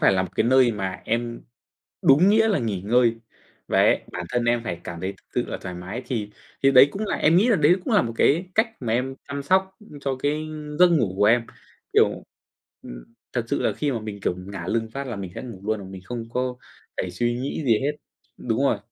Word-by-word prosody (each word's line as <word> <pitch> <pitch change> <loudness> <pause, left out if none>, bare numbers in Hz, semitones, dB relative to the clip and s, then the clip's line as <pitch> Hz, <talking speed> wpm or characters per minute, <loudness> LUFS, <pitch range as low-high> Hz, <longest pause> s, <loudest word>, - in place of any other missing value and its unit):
phải - - +5
là 95 -1 +2
một 95 - -4
cái - - +3
nơi 130 -1 +4
mà 95 -2 -4
em 115 +1 -2 0.6
đúng 150 +8 +6
nghĩa 220 +1 +4
là 200 - +2
nghỉ 105 -7 -2
ngơi. 115 +2 +3 0.5
Và - - +2
em - - +4
bản - - -4
thân 120 -1 0
em 120 0 +1
phải 85 -6 -4
cảm 85 0 -6
thấy 95 +1 -3
thực - - -24
sự - - 0
là - - -4
thoải 90 - -6
mái 95 +8 -6
thì 105 -5 -3 0.3
thì 135 - +6
đấy 135 +2 +8
cũng 210 +2 -4
là - - -1
em 160 +3 +3
nghĩ 215 +7 +4
là 225 - +4
đấy 155 +3 +5
cũng 235 - -2
là 205 - +5
một 115 - -3
cái 175 +6 +2
cách 220 +1 +3
mà 115 -3 -2
em 130 +3 -1
chăm 140 0 -4
sóc, 190 +5 +2 0.2
ưm, 145 - -11
cho 135 -1 -2
cái 145 +3 -1 0.4
giấc 180 - +8
ngủ 115 - +1
của 105 - +3
em, 115 +2 +4 0.5
kiểu, - - +3 0.6
ừm, - - -9 0.3
thật 120 -2 -1
sự 140 - -1
là - - +1
khi 145 -2 -1
mà 115 - -2
mình, 105 -2 -7
kiểu, 90 - 0
ngả 90 -1 -7
lưng 115 +1 -1
phát 140 +2 -5
là 120 -4 -5
mình 95 -3 -6
sẽ - - -6
ngủ 115 -7 -9
luôn, 110 0 0
mà - - -9
mình 95 -1 -10
không 115 0 -6
có 125 0 -2 0.4
phải - - -2
suy 120 0 -1
nghĩ 140 +3 -3
gì 115 -5 +4
hết. 145 +2 0 0.4
Đúng 120 +2 -1
rồi. 115 - +2
120 Hz, 245 wpm, -24 LUFS, 105-140 Hz, 0.6 s, đấy